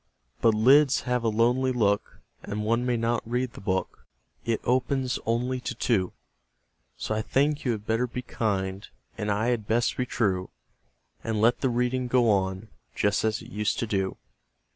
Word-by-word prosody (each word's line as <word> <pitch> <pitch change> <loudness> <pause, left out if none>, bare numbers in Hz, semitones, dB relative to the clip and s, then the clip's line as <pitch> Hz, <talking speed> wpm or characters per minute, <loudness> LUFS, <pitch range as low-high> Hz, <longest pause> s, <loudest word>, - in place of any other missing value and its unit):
But 115 -2 +4
lids 135 +5 +5
have 125 -1 -1
a 115 - +2
lonely 120 +4 +2
look, 105 -5 0 0.2
And 105 +1 -4
one 115 +3 +1
may 120 -1 +1
not 115 +1 0
read 125 +1 -2
the - - -11
book 95 -1 -3 0.4
It 115 -1 0
opens 130 +1 0
only 125 +3 0
to 125 0 -5
two; 105 -6 0 0.8
So - - -3
I 110 - 0
think 145 +6 +1
you 125 - +2
had 105 -1 -6
better 115 +3 +1
be 125 +1 -5
kind, 100 -4 -2 0.3
And 105 -1 -3
I 105 +3 +1
had 115 -4 -1
best 115 +1 +1
be 125 - -1
true, 95 -7 0 0.7
And 110 -2 -1
let 115 +3 +3
the 130 - +2
reading 125 +1 0
go 120 -2 +3
on, 95 +1 -1 0.3
Just 100 -2 +1
as 110 0 0
it 120 - -13
used 105 -1 -1
to - - -1
do. 95 -3 -1
115 Hz, 180 wpm, -27 LUFS, 105-125 Hz, 0.8 s, lids